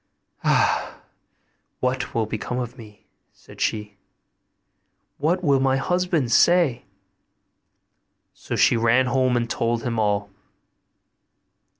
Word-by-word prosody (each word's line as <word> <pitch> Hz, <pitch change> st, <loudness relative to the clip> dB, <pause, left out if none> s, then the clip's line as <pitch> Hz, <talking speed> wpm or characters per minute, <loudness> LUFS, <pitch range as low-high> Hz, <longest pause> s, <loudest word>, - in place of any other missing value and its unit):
'Ah! -, -, +1 dB, 0.8 s
what 130 Hz, 0 st, -2 dB
will 115 Hz, -1 st, +1 dB
become 110 Hz, +3 st, -4 dB
of 125 Hz, -1 st, -4 dB
me?' 105 Hz, -5 st, -15 dB, 0.3 s
said -, -, -15 dB
she; 105 Hz, -2 st, -2 dB, 1.2 s
'what 170 Hz, +6 st, 0 dB
will 140 Hz, -4 st, +3 dB
my 135 Hz, 0 st, +2 dB
husband 170 Hz, -3 st, 0 dB
say?' 150 Hz, -3 st, +3 dB, 1.5 s
So -, -, -6 dB
she -, -, +4 dB
ran 115 Hz, +3 st, +3 dB
home 130 Hz, 0 st, +1 dB
and 120 Hz, -1 st, -1 dB
told 115 Hz, 0 st, -1 dB
him 115 Hz, -2 st, -2 dB
all. 100 Hz, -1 st, 0 dB
125 Hz, 105 wpm, -23 LUFS, 115-135 Hz, 1.5 s, she